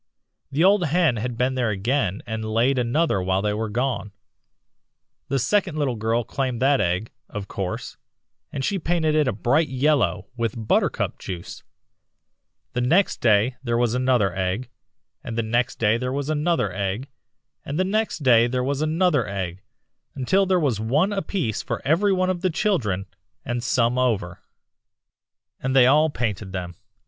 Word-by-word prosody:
The 145 +4 +1
old 195 -1 +5
hen 160 -5 +2
had 120 +2 -3
been 125 +2 +1
there 125 -3 0
again 105 0 -1
and 110 -2 -4
laid 115 +5 +1
another 125 - +1
while 95 +1 0
they 105 0 +1
were 110 +1 -2
gone. 120 -3 -2 1.1
The 135 - 0
second 175 - +1
little 140 -4 0
girl 115 +2 0
claimed 130 -1 -3
that 135 +1 +3
egg, 90 +5 -1 0.2
of 105 -3 -6
course, 95 -2 -5 0.5
and 135 - -3
she 200 - 0
painted 160 -2 0
it 150 -2 +3
a - - +2
bright 140 +10 +1
yellow 130 - +1
with 115 -2 -3
buttercup - - +1
juice. 90 -3 -7 1.1
Then 125 - 0
the - - 0
next 190 +5 +2
day 115 +2 +3
there 120 -3 -1
was 120 -1 +1
another 125 -7 +2
egg, 95 +7 -2 0.5
and 115 - -5
the 115 - +1
next 120 +2 0
day 110 0 +2
there 125 +1 -3
was 140 +2 -2
another 150 - 0
egg, 100 +6 -3 0.6
and 145 - -4
the 185 - +3
next 205 -4 -1
day 120 -3 +5
there 125 +1 -1
was 140 +2 -1
another 155 - +2
egg, 95 -2 -4 0.5
until 190 +9 +2
there 185 -1 +3
was 135 - 0
one 145 - +1
apiece 190 - -2
for - - -4
every 175 +8 +3
one 185 -1 +2
of 175 -2 -4
the 185 - +1
children, 155 - 0 0.4
and 120 -1 -2
some 125 0 +1
over." 110 -8 0 1.2
"'And 135 0 -1
they 130 -2 +7
all 150 +5 +5
painted 105 -7 -3
them. 90 -2 -4
125 Hz, 170 wpm, -23 LUFS, 110-150 Hz, 1.2 s, they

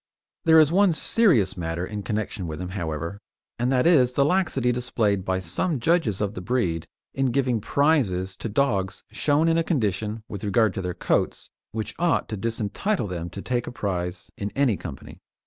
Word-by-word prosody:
There 160 -1 +7
is 155 -1 +5
one 190 0 +4
serious 155 - +3
matter 85 0 -3
in 105 +1 -5
connection 105 -3 -3
with 80 -1 -5
him, 90 - -4
however, 85 0 -4 0.4
and 125 +2 +1
that 125 -1 +2
is 130 -8 +5
the 140 +2 +3
laxity 150 -8 +1
displayed 110 -5 0
by 95 0 0
some 95 - -1
judges 120 - +1
of 100 -1 -1
the 90 - -6
breed 90 -7 -1 0.3
in 135 0 +1
giving 125 -3 +1
prizes 105 - +1
to 115 - -4
dogs 100 -6 0
shown 150 +2 +2
in 165 0 +3
a - - +2
condition, 110 - -1
with 100 -1 -7
regard 105 0 +2
to - - -3
their 90 -1 -3
coats, - - -1 0.2
which 110 0 -4
ought 170 -2 +2
to 110 - -3
disentitle 115 - -1
them 85 -2 -4
to 100 +3 -8
take 120 -1 -1
a - - -4
prize 90 -5 -4
in 100 - -2
any 135 -6 +3
company. 70 -6 -9
110 Hz, 185 wpm, -25 LUFS, 95-140 Hz, 0.4 s, There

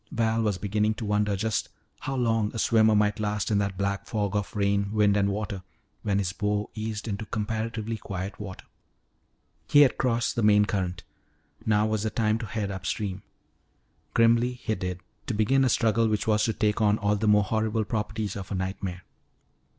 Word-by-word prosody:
Val 115 0 +1
was 105 -4 0
beginning 105 +3 0
to 115 - -5
wonder 105 0 +1
just 110 +2 -1 0.3
how 135 - -3
long 115 -4 +1
a - - -3
swimmer 110 -1 +4
might 105 0 +2
last 105 0 -1
in 100 - +3
that 100 -2 -2
black 100 0 -2
fog 105 -2 -1
of 105 0 -2
rain, 100 0 +1
wind, 105 -2 +3
and 100 -1 +2
water 100 -1 -3 0.4
when 100 -2 0
his 95 -3 -1
bow 105 +1 -1
eased 110 0 -4
into 100 0 -3
comparatively 110 +1 -3
quiet 95 -1 -6
water. 95 -3 -8 1.0
He 145 - +6
had 140 - +4
crossed 120 -2 +1
the 115 - 0
main 105 -1 +5
current; 90 -4 -2 0.6
now 105 -1 +3
was 110 -1 0
the 110 - 0
time 110 -1 +1
to 115 - -5
head 100 -1 -3
upstream. 95 +1 -3 0.9
Grimly 115 +2 +4
he 120 -3 -3
did, 90 -2 -4 0.3
to 120 - -1
begin 130 +6 +3
a 130 - +3
struggle 115 -1 +2
which 105 -1 0
was 105 -1 +2
to 115 - 0
take 105 +1 0
on 105 0 +4
all 105 -1 +1
the 110 +1 -1
more 105 0 +5
horrible 110 +1 0
properties 105 -1 -3
of 95 -2 -7
a - - -1
nightmare. 95 -1 -4
105 Hz, 190 wpm, -27 LUFS, 100-110 Hz, 1.0 s, He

